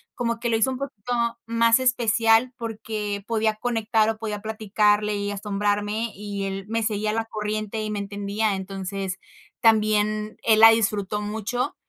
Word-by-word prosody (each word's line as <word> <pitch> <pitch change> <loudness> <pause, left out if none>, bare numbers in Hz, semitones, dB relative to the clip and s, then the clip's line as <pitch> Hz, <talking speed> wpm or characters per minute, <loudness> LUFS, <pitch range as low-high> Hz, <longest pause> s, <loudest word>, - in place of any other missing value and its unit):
como 235 -1 -1
que 235 - -2
lo 230 - +2
hizo 225 +4 +2
un 260 - -4
poquito 245 -4 -6 0.3
más 230 +1 +3
especial 235 -1 +3
porque 215 -3 -4
podía 220 -1 +1
conectar 225 -1 +1
o 225 - -2
podía 215 -1 -4
platicarle 210 -1 +1
y 205 0 -2
asombrarme, 205 +2 -1
y 200 -1 -4
él 195 0 -4
me 230 0 0
seguía 215 0 0
la 225 +1 -1
corriente 215 0 -3
y 215 - -3
me 210 - -2
entendía. 200 +1 -1
Entonces, 190 0 -5 0.4
también 215 -1 +2
él 220 -1 +4
la 225 - +11
disfrutó 210 -2 0
mucho, 220 +6 -3
215 Hz, 155 wpm, -24 LUFS, 205-225 Hz, 0.4 s, la